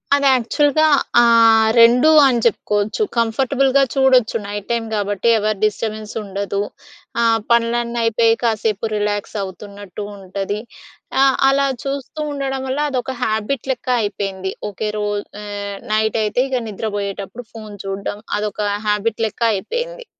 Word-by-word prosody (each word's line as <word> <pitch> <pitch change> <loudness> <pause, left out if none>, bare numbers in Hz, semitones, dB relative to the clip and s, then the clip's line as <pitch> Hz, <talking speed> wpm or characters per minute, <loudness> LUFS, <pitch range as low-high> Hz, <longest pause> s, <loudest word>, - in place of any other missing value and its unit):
అది 280 -1 +2
యాక్చువల్‍గా 290 +5 +2 0.3
ఆహ్, 225 -1 +5
2 245 +6 +6 0.2
అని 245 -2 +2
చెప్పుకోవచ్చు. 210 - 0
కంఫర్టబుల్‌గా 265 +4 +2
చూడొచ్చు. 260 -4 +3
నైట్ 205 0 -6
టైమ్ 230 -1 -1
గాబట్టి, 205 +1 0
ఎవరి 215 0 0
డిస్టర్బెన్స్‌ 215 0 -3
ఉండదు. 200 0 -3 0.6
ఆహ్, 230 -1 +3
పనులన్నీ 235 0 +1
అయిపోయి 230 0 +3
కాసేపు 220 -2 0
రిలాక్స్ 205 0 -2
అవుతున్నట్టు 200 +1 -8
ఉంటది. 195 +2 -4 0.6
ఆహ్, 270 -1 +5
అలా 275 0 +2 0.2
చూస్తూ 275 +2 -5
ఉండడం 270 -1 -3
వల్ల, 265 +2 -2
అదొక 260 0 -2
హ్యాబిట్ 220 +5 -2
లెక్క 255 - -6
అయిపేయింది. 195 -2 -3 0.2
ఓకే 210 +2 -4
రోజు 205 0 -2 0.2
ఆహ్, 200 -1 -5 0.2
నైటైతే 220 +1 +1
ఇగ 255 -2 0
నిద్రపోయేటప్పుడు 205 +2 -5
ఫోన్ 215 -2 -9
చూడడం, 195 +1 -4 0.2
అదొక 210 0 -3 0.3
హ్యాబిట్ 210 +2 0
లెక్క 215 - -12
అయిపోయింది. 485 - -4
220 Hz, 125 wpm, -19 LUFS, 205-250 Hz, 0.6 s, 2